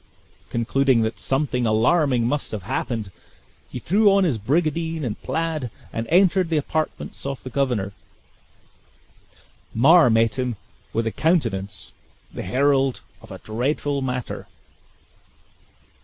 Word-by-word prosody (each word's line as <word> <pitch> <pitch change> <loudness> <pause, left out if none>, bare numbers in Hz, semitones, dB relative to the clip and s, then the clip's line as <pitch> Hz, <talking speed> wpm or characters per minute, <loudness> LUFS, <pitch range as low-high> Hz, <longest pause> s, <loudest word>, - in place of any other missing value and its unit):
Concluding 125 +1 +2
that 110 +1 -3
something 135 -3 0
alarming 125 +3 +3
must 145 +4 -1
have 105 -4 -4
happened, 110 0 -3 0.6
he - - -6
threw 200 - +3
on 195 0 +4
his 145 -11 +1
brigandine 160 +6 0
and 110 -3 -4
plaid, 160 -6 -2 0.2
and 115 0 -3
entered 185 +1 +3
the 160 - +1
apartments 155 +2 -3
of 135 -1 -5
the 130 - -7
governor. 120 -8 -1 1.8
Mar 155 +5 +6
met 115 +2 +2
him 125 -2 -1 0.4
with 115 0 -1
a 115 - 0
countenance, 115 - -1 0.4
the - - -5
herald 135 +4 +1 0.2
of - - -15
a - - -7
dreadful 140 +5 -2
matter. 125 -2 -4
135 Hz, 125 wpm, -23 LUFS, 115-155 Hz, 1.8 s, Mar